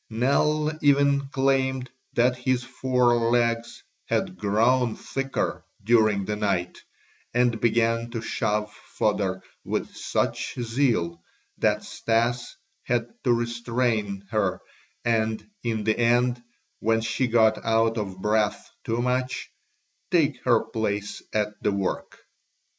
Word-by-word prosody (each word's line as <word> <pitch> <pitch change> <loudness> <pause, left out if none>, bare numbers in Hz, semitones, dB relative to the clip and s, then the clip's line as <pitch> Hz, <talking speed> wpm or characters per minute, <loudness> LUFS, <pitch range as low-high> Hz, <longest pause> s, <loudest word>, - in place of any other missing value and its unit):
Nell 145 +6 +2
even 140 -1 +3
claimed 130 -1 +1 0.2
that 125 +1 +3
his 125 0 0
fore 125 -2 +2
legs 120 -1 0 0.2
had - - -1
grown 110 +5 +2
thicker 135 0 -3 0.2
during 110 -3 +3
the 105 - -2
night, 100 -4 -1 0.6
and 120 -2 +2
began 115 0 +2
to 115 -1 -4
shove 105 -1 -1
fodder 95 -3 -1 0.2
with - - -3
such - - -1
zeal 115 -9 0 0.4
that - - +2
Stas 120 +2 -1 0.3
had 120 -1 -1
to 125 - +3
restrain 120 -4 -1
her 100 -4 0 0.5
and 110 -1 0
in 110 -2 -1
the 110 +2 +1
end 120 +1 +3 0.4
when 115 +1 +2
she 125 +3 0
got 110 -1 +3
out 115 0 +2
of 95 -3 -4
breath 105 +2 0
too 115 +2 -1
much, 125 +1 -1 0.6
take 150 -7 +2
her 115 - +4
place 105 -2 -3
at 105 -1 +1
the - - +1
work. 100 -1 -3
115 Hz, 120 wpm, -25 LUFS, 110-125 Hz, 0.6 s, her